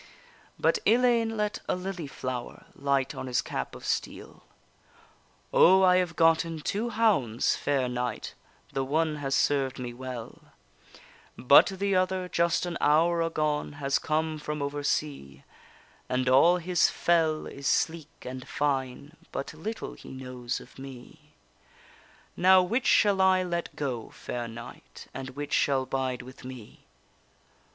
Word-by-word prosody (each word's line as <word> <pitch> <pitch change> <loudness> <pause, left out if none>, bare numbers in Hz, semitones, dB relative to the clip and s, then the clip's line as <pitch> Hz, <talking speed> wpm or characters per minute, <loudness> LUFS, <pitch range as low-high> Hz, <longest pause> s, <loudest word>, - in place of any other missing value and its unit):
But - - +2
Ellayne 230 -2 +3
let 210 0 -1
a - - +2
lily 180 -3 -5
flower 130 -2 -6
Light 140 -1 0
on - - -6
his 125 -1 0
cap - - -4
of - - -10
steel: - - -4 1.1
O, 190 +2 +6
I 180 -1 +6
have 180 -3 0
gotten 165 0 +3
two 210 +9 -2
hounds, 205 - +2
fair 135 -3 0
knight, 125 -2 -3 0.4
The 135 - 0
one 155 +3 0
has 135 -2 -1
served 135 -2 +1
me 125 -2 -5
well; 125 -2 -8 1.0
But 135 +3 +7
the 195 0 -1
other, 185 0 0
just 170 0 +1
an 175 -1 -4
hour 165 +3 +3
agone, 155 -3 -1
Has 140 -1 0
come 155 0 -1
from 150 0 -4
over 145 +1 -3
sea, 135 - -3 0.7
And 130 0 0
all 140 +8 +6
his 180 0 +2
fell 160 -2 +1
is 140 -1 -6
sleek 160 -2 0 0.2
and 130 0 -7
fine, 140 +1 -2 0.2
But 140 - -5
little 210 +9 -6
he - - -13
knows 125 -2 -5
of - - -15
me. 135 -2 -12 1.0
Now, 185 +1 +6
which 230 +7 -1
shall 200 -2 +4
I 185 -1 +4
let 170 -1 -3
go, 130 -6 -4
fair 120 -1 -6
knight, 115 +1 -11
And 130 0 -6
which 145 0 -5
shall 135 -2 +2
bide 130 -2 -2
with 130 +1 -13
me? 125 -4 -11
150 Hz, 145 wpm, -28 LUFS, 130-180 Hz, 1.1 s, But